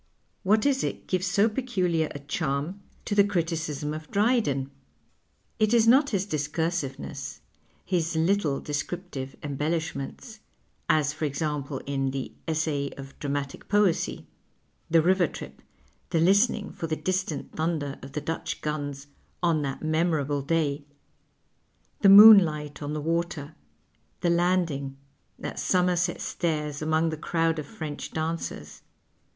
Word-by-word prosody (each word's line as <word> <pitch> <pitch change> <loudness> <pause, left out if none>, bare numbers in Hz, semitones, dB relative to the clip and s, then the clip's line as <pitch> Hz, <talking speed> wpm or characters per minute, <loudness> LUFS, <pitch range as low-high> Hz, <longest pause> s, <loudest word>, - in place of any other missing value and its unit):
What 215 +4 +3
is 275 -2 +2
it - - -3
gives 185 0 -1
so 200 +4 +3
peculiar 185 -10 0
a - - -7
charm 145 +5 -3 0.2
to - - -2
the 205 0 +6
criticism 160 -6 -2
of 155 0 -7
V2o - - -21
PASTICHE - - -2
AND 220 +5 +4
PREJUDICE 140 - 0
Drydcn? 205 - -5
Is 225 -1 +4
it - - +8
not 280 +3 +4
his 195 -3 0
discursiveness, 155 - -3 0.4
his 170 -3 0
httle 160 -3 +1
descriptive 145 -2 -4
embellishments 155 - -3 0.2
— - - -42
as, 150 -2 +3
for 155 0 -3
example, 145 -1 -3
in 135 -1 -1
the 135 -1 -4
" - - -36
Essay 155 -3 0
of 135 0 -10
Dramatic 140 -1 -4
Poesy," 205 -4 +1 0.6
the 165 -1 +4
river 180 0 +3
trip, - - -10 0.5
the 170 -2 +1
listening 205 +5 +3
for 165 - -5
the 155 - -1
distant 185 0 -2
thnnder 155 -5 -2
of 135 +1 -10
the 150 - -2
Dutch 160 +3 -4
guns 145 -2 -4 0.4
"on 165 -3 +3
that 135 0 -4
memorable 155 -3 +1
day," 145 -1 0 1.2
the 200 - +6
moonlight 180 -9 +8
on 145 0 -3
the 150 - -3
water, 165 -2 -2 0.7
the 175 - +2
landing 170 -6 +1 0.5
at - - -4
Somerset 180 -1 +1
Stairs 150 -4 -2
among 160 +1 +2
the 155 - -4
crowd 165 0 0
of 150 - -6
French 155 -9 -6
dancers 160 +1 -4
160 Hz, 145 wpm, -27 LUFS, 145-180 Hz, 1.2 s, it